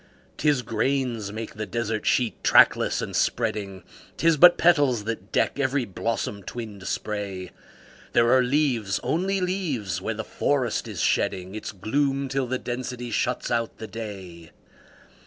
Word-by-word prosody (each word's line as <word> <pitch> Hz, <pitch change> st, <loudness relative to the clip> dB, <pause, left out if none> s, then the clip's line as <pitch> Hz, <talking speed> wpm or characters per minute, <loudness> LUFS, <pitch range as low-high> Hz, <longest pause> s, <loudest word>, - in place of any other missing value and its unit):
'Tis 145 Hz, -4 st, +2 dB
grains 115 Hz, -2 st, -1 dB
make 110 Hz, +1 st, -6 dB
the 110 Hz, 0 st, -4 dB
desert 115 Hz, -2 st, -2 dB
sheet, 120 Hz, -6 st, +1 dB
trackless -, -, +5 dB
and -, -, -5 dB
spreading; 100 Hz, -3 st, -1 dB, 0.3 s
'Tis 165 Hz, -1 st, +4 dB
but 175 Hz, +4 st, +8 dB
petals 145 Hz, -10 st, +3 dB
that 110 Hz, -2 st, -5 dB
deck -, -, +1 dB
every 135 Hz, -1 st, +1 dB
blossom 105 Hz, 0 st, -3 dB
twinned 105 Hz, -2 st, -7 dB
spray; 100 Hz, -4 st, -4 dB, 0.6 s
There 120 Hz, +1 st, +4 dB
are 130 Hz, -, +5 dB
leaves 125 Hz, -7 st, +1 dB
only 190 Hz, +4 st, 0 dB
leaves 145 Hz, -, -2 dB
where 110 Hz, +3 st, -2 dB
the 110 Hz, -, -4 dB
forest 130 Hz, 0 st, -1 dB
is -, -, -4 dB
shedding 95 Hz, 0 st, 0 dB
Its 110 Hz, -, -5 dB
gloom 135 Hz, +7 st, -1 dB
till 135 Hz, -1 st, -1 dB
the 130 Hz, +1 st, -1 dB
density 125 Hz, -1 st, -5 dB
shuts 125 Hz, +3 st, -1 dB
out 115 Hz, -1 st, -1 dB
the 110 Hz, -, -7 dB
day. 95 Hz, -6 st, -8 dB
115 Hz, 145 wpm, -25 LUFS, 105-135 Hz, 0.6 s, but